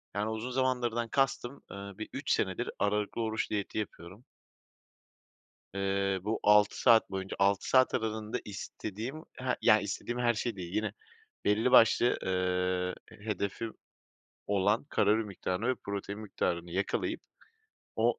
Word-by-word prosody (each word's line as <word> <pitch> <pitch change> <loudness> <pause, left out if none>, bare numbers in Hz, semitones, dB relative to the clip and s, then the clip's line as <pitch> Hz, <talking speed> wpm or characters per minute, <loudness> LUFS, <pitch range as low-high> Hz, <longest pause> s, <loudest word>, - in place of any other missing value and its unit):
yani 105 +2 0
uzun 110 +3 -3
zamandırdan 125 -2 0
kastım, 135 0 0
ııı, 100 0 -8
bir 110 - -6
3 - - -2
senedir, - - 0
aralıklı 105 +2 0
oruç 110 0 -1
diyeti 105 -1 -3
yapıyorum. 100 +1 -6 1.5
Eee, 100 0 0
bu 110 +2 -1
6 105 0 +5
saat 115 -3 +6
boyunca, 95 0 -4
6 100 0 +2
saat 130 -1 +5
aralığında 110 0 -2
istediğim 110 +7 -6
he 130 0 -1
yani, 110 0 +5
istediğim 120 +4 -3
her 120 -1 +3
şey 115 0 -2
değil, 90 -2 -7
yine 110 - -1 0.5
belli 110 +5 +3
başlı, 115 +1 +6
ııı, 90 0 0
h - - -15
hedefim 105 +2 -3 0.7
olan 100 +2 +2
kalori 105 +2 +3
miktarını 100 +2 -3
ve 130 - +2
protein 100 -1 -5
miktarını 85 -5 -2
yakalayıp, 95 +3 -1 0.8
o - - +2
105 Hz, 135 wpm, -31 LUFS, 100-115 Hz, 1.5 s, saat